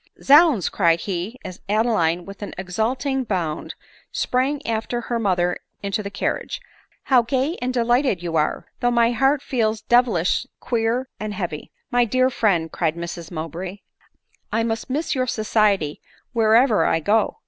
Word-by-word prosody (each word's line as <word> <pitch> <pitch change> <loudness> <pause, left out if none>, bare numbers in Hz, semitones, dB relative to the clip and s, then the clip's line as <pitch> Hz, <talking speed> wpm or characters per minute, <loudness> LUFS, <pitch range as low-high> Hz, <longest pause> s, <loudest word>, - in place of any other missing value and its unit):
" - - -22
Zounds!" 285 - +6
cried 170 -3 +2
he, 195 +5 -4
as 185 - -8
Adeline, 200 -6 +1
with 195 +1 -10
an 205 - -6
exulting 245 +8 -1
bound, 175 -9 -3 0.4
sprang 265 +3 0
after 230 +1 -2
her 235 0 -2
mother 180 -4 +1 0.2
into 200 +1 -1
the 200 - -5
carriage, 200 - -3 0.2
" - - -38
how 255 -3 +5
gay 265 +7 -1
and 250 +1 -1
delighted 240 -5 +1
you 170 -2 -3
are! 150 -1 0
though 245 - +2
my 235 -1 +3
heart 270 +4 +2
feels 220 -4 -1
devilish 240 -3 +2
queer 235 +2 -1
and 215 -1 -4
heavy." 170 -6 -5
" - - -52
My 245 0 +4
dear 255 +3 +2
friend," 175 -9 +1
cried 160 -2 -1
Mrs 170 -1 -6
Mowbray, 175 +4 -6 0.3
" - - -42
I 225 +1 +1
must 225 +2 -3
miss 295 +5 -1
your 255 -2 0
society 210 -9 +1 0.3
wherever 225 +1 +4
I 165 - +2
go." 210 +6 +1
220 Hz, 165 wpm, -22 LUFS, 180-245 Hz, 0.4 s, Zounds